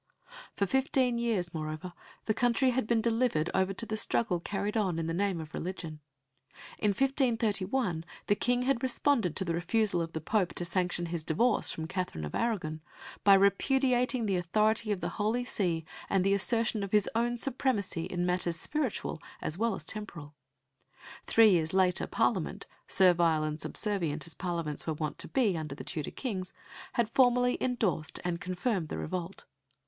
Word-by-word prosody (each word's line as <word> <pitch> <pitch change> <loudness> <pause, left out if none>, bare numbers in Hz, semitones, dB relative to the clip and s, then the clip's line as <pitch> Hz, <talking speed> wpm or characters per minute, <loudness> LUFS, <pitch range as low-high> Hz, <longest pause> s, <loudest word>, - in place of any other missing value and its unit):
For 200 - +1
fifteen 260 +1 +1
years, 210 -8 -1
moreover, 155 +2 -5 0.3
the 215 - +1
country 245 +3 +2
had 250 -3 -1
been 225 -1 +2
delivered 230 -9 +1
over 190 0 +2
to 210 - -4
the 220 - -3
struggle 215 -4 +1
carried 200 +4 -3
on 190 -6 +1
in 165 - -2
the 165 - -2
name 190 -1 0
of 160 0 -8
religion. 165 -4 -5 0.8
In 210 - +2
1531 225 - +1 0.2
the - - +3
King 245 +4 +1
had 260 -2 +1
responded 255 - +1
to 190 - 0
the 170 - -1
refusal 180 +2 +1
of 165 0 -4
the 160 - -2
Pope 185 +3 0
to 175 - -2
sanction 175 0 -1
his 165 -1 -4
divorce 220 +10 +2
from 160 - -4
Katherine 180 - -3
of 75 - -7
Aragon 175 -10 -1 0.4
by 200 -1 +8
repudiating 250 +5 +2
the 195 -3 +1
authority 215 +5 +1
of 195 -3 -1
the - - -1
Holy 230 +4 +1
See 170 -8 -1 0.2
and 190 -2 +2
the 195 +1 +3
assertion 225 +2 +2
of 200 -1 -4
his 210 -1 +3
own 240 +1 0
supremacy 235 -10 -1
in 180 -1 -2
matters 180 -1 0
spiritual 270 - -2 0.2
as 155 - -3
well 225 +2 0
as - - -8
temporal. 170 -9 -6 0.9
Three 225 -2 +6
years 165 -1 +1
later 185 -1 +3
Parliament, - - 0 0.2
servile 170 -4 +4
and 155 0 -3
subservient 170 -8 0
as 165 - -4
Parliaments 170 -5 -2
were 160 - -1
wont 155 0 -4
to - - +1
be 230 -9 +2
under 155 -3 -4
the - - -8
Tudor 155 -4 -4
Kings, 190 -8 -4 0.4
had 235 -2 +1
formally 245 +1 +3
endorsed 205 - -1
and 175 -1 -2
confirmed 185 -1 -1
the - - -4
revolt. 180 +2 -5
195 Hz, 175 wpm, -30 LUFS, 170-230 Hz, 0.9 s, by